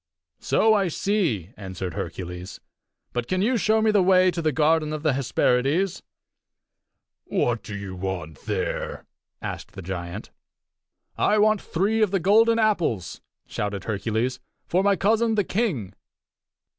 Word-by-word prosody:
"So 220 Hz, 0 st, +3 dB
I 200 Hz, -3 st, +2 dB
see," 165 Hz, -, -1 dB
answered 95 Hz, -3 st, -6 dB
Hercules. 90 Hz, +2 st, -6 dB, 0.5 s
"But 120 Hz, -1 st, -2 dB
can 185 Hz, +1 st, 0 dB
you 250 Hz, +4 st, +2 dB
show 220 Hz, 0 st, +2 dB
me 220 Hz, -, +4 dB
the 205 Hz, -2 st, +4 dB
way 185 Hz, 0 st, +5 dB
to 170 Hz, 0 st, -3 dB
the 155 Hz, -1 st, +1 dB
garden 155 Hz, +1 st, +2 dB
of 155 Hz, -1 st, -5 dB
the 155 Hz, -3 st, +3 dB
Hesperides?" 135 Hz, +6 st, +1 dB, 1.2 s
"What 120 Hz, -3 st, 0 dB
do 105 Hz, -, -7 dB
you 100 Hz, -2 st, -6 dB
want 90 Hz, -5 st, -5 dB
there?" -, -, -3 dB, 0.4 s
asked -, -, -6 dB
the 95 Hz, -, -8 dB
giant. 85 Hz, -1 st, -6 dB, 0.9 s
"I 210 Hz, -, +3 dB
want 215 Hz, -1 st, +3 dB
three 205 Hz, +6 st, 0 dB
of 215 Hz, -, +4 dB
the 195 Hz, 0 st, +1 dB
golden 225 Hz, +6 st, +4 dB
apples," 175 Hz, -, 0 dB, 0.2 s
shouted 100 Hz, -2 st, -4 dB
Hercules, 110 Hz, +4 st, -1 dB, 0.3 s
"for 180 Hz, -, +1 dB
my 200 Hz, 0 st, +3 dB
cousin, 225 Hz, +3 st, +2 dB
the 205 Hz, -, +2 dB
king." 180 Hz, -, -1 dB
155 Hz, 145 wpm, -24 LUFS, -, 1.2 s, way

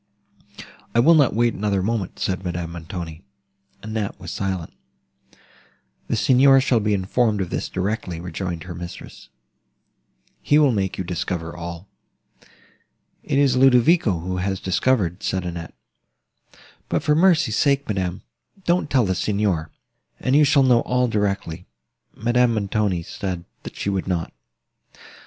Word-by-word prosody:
"I -, -, +5 dB
will 160 Hz, +8 st, +6 dB
not 145 Hz, -8 st, +4 dB
wait 120 Hz, +1 st, +2 dB
another 100 Hz, -2 st, -1 dB
moment," 105 Hz, -3 st, -2 dB
said 95 Hz, 0 st, -2 dB
Madame 85 Hz, -2 st, -4 dB
Montoni. 85 Hz, -1 st, -7 dB, 0.6 s
Annette 110 Hz, -2 st, -4 dB
was -, -, -7 dB
silent. 95 Hz, -4 st, -3 dB, 1.3 s
"The -, -, 0 dB
Signor 135 Hz, +1 st, +5 dB
shall 130 Hz, -3 st, +2 dB
be 105 Hz, -1 st, +1 dB
informed 105 Hz, +3 st, +1 dB
of 95 Hz, -3 st, -3 dB
this -, -, -3 dB
directly," 95 Hz, -3 st, -3 dB
rejoined 90 Hz, -1 st, -5 dB
her 90 Hz, -1 st, -7 dB
mistress; 85 Hz, 0 st, -10 dB, 1.1 s
"he 145 Hz, -, +3 dB
will 145 Hz, -3 st, +5 dB
make 95 Hz, -4 st, -1 dB
you 95 Hz, -, -2 dB
discover 85 Hz, -1 st, -4 dB
all." 85 Hz, +2 st, -7 dB, 1.3 s
"It 140 Hz, -, -1 dB
is 140 Hz, -3 st, +3 dB
Ludovico, 125 Hz, -, +4 dB
who 90 Hz, +2 st, -3 dB
has 95 Hz, +1 st, -2 dB
discovered," 95 Hz, -2 st, 0 dB
said 95 Hz, -1 st, -2 dB
Annette: 85 Hz, -1 st, -6 dB, 1.1 s
"but -, -, 0 dB
for 150 Hz, -, +3 dB
mercy's 160 Hz, -, +3 dB
sake, 140 Hz, -1 st, +2 dB
madam, 95 Hz, -4 st, -2 dB, 0.4 s
don't 175 Hz, -3 st, +1 dB
tell 130 Hz, -5 st, +3 dB
the 95 Hz, -, 0 dB
Signor, 100 Hz, -6 st, -1 dB, 0.5 s
and 130 Hz, -, +1 dB
you 150 Hz, -, +6 dB
shall 140 Hz, -1 st, +4 dB
know 125 Hz, -2 st, +5 dB
all 125 Hz, 0 st, +1 dB
directly." 100 Hz, -5 st, -2 dB, 0.5 s
Madame 120 Hz, +1 st, +2 dB
Montoni 100 Hz, -4 st, 0 dB
said, 90 Hz, 0 st, -5 dB, 0.2 s
that -, -, -9 dB
she 100 Hz, -, -2 dB
would 95 Hz, -1 st, -2 dB
not. 85 Hz, -3 st, -2 dB
100 Hz, 140 wpm, -22 LUFS, 90-125 Hz, 1.3 s, will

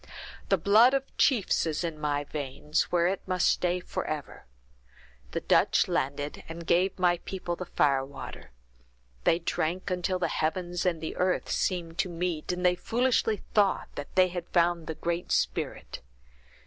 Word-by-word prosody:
The 195 Hz, -, +4 dB
blood 220 Hz, -, +5 dB
of 270 Hz, 0 st, -3 dB
chiefs 230 Hz, -, +2 dB
is 155 Hz, +1 st, -2 dB
in 165 Hz, -3 st, -4 dB
my 145 Hz, -1 st, 0 dB
veins, 145 Hz, +1 st, -2 dB
where 170 Hz, -1 st, +3 dB
it 190 Hz, +2 st, 0 dB
must 185 Hz, -1 st, +2 dB
stay 180 Hz, 0 st, +1 dB
forever. 155 Hz, -, -5 dB, 0.8 s
The -, -, -3 dB
Dutch -, -, +3 dB
landed, 145 Hz, +2 st, -2 dB
and 165 Hz, +1 st, -7 dB
gave 180 Hz, +3 st, +2 dB
my 175 Hz, -2 st, +2 dB
people 180 Hz, -2 st, -4 dB
the 180 Hz, 0 st, -7 dB
fire 140 Hz, -5 st, +2 dB
water; 135 Hz, -, -9 dB, 0.8 s
they 165 Hz, -, +4 dB
drank 175 Hz, +2 st, -2 dB
until 180 Hz, +1 st, 0 dB
the 180 Hz, -, 0 dB
heavens 175 Hz, +3 st, -1 dB
and 170 Hz, -3 st, 0 dB
the 160 Hz, -, -4 dB
earth 185 Hz, 0 st, 0 dB
seemed 170 Hz, -3 st, -1 dB
to 185 Hz, -, +1 dB
meet, 175 Hz, -1 st, -2 dB
and 180 Hz, 0 st, -2 dB
they 180 Hz, -, +5 dB
foolishly 230 Hz, +1 st, 0 dB
thought 205 Hz, -4 st, +2 dB, 0.3 s
they 185 Hz, -1 st, +5 dB
had 175 Hz, -1 st, -5 dB
found 170 Hz, -1 st, +2 dB
the 160 Hz, -, -4 dB
Great 170 Hz, +2 st, -3 dB
Spirit. -, -, -1 dB
175 Hz, 160 wpm, -28 LUFS, 160-185 Hz, 0.8 s, blood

